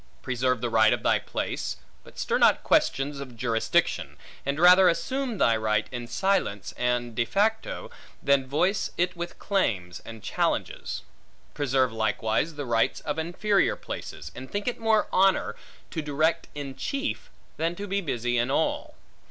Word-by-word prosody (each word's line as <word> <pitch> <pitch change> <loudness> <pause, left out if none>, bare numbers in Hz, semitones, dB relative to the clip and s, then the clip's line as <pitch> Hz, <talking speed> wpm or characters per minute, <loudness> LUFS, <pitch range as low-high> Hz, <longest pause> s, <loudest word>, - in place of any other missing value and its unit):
Preserve 125 -1 0
the 120 - -1
right 110 -1 +5
of - - -3
thy - - +3
place; - - -3 0.3
but - - -16
stir - - 0
not - - +5
questions 140 +1 +1
of 130 -4 -8
jurisdiction; 115 -1 0 0.3
and 140 +2 -1
rather 180 +2 +8
assume 255 +7 -1
thy 115 -10 +4
right, 110 -1 +1
in 120 -1 -5
silence 190 - 0
and 125 -1 0
de 120 - +1
facto, 210 - -1 0.3
than 140 -2 +3
voice 180 +9 +1
it 180 +1 +1
with 175 0 -6
claims, 95 - -1
and 115 -2 -10
challenges. - - -2 0.5
Preserve 130 -4 +1
likewise 110 +7 0
the 145 -1 -4
rights 115 -2 +1
of 150 +1 -3
inferior 190 +5 +1
places; 75 +3 -7
and 130 +1 -9
think 205 +2 -3
it 245 - -1
more 225 -1 +3
honor, 190 0 +3 0.4
to 160 - -2
direct 155 +2 0
in 140 -2 -6
chief, 275 - -3 0.3
than 165 +2 0
to 200 - -5
be 200 +1 0
busy 120 - -1
in 120 +2 +1
all. 155 +4 0
140 Hz, 160 wpm, -27 LUFS, 120-185 Hz, 0.5 s, rather